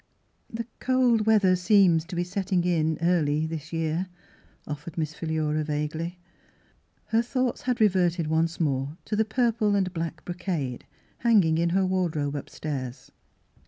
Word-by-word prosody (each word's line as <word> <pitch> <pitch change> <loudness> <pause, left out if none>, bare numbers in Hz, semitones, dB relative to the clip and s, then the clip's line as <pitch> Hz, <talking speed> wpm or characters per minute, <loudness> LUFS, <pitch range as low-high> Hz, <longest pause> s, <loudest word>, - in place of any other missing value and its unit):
" - - -44
The 230 0 -4
cold 245 -4 +2
weather 200 -4 +5
seems 180 -3 +4
to 180 +1 -7
be 175 - 0
setting 180 0 -1
in 160 -3 +1
early 155 -3 +2
this 160 -1 -6
year," 165 +2 -1 0.6
offered 150 +2 -7
Miss 155 -1 -2
Philura 155 -2 -1
vaguely. 155 +3 -3 0.9
Her 225 +1 +3
thoughts 250 0 -1
had 250 -1 -1
reverted 180 -5 +3
once 160 +2 0
more 140 -1 -1
to 215 - -2
the 220 +1 +2
purple 220 -2 +1
and 190 -2 0
black 165 -1 -4
brocade, 175 -8 -3 0.3
hanging 195 -9 +4
in 170 0 +2
her 190 +2 +2
wardrobe 170 -6 0
upstairs. 135 -3 -6
170 Hz, 145 wpm, -26 LUFS, 155-200 Hz, 0.9 s, weather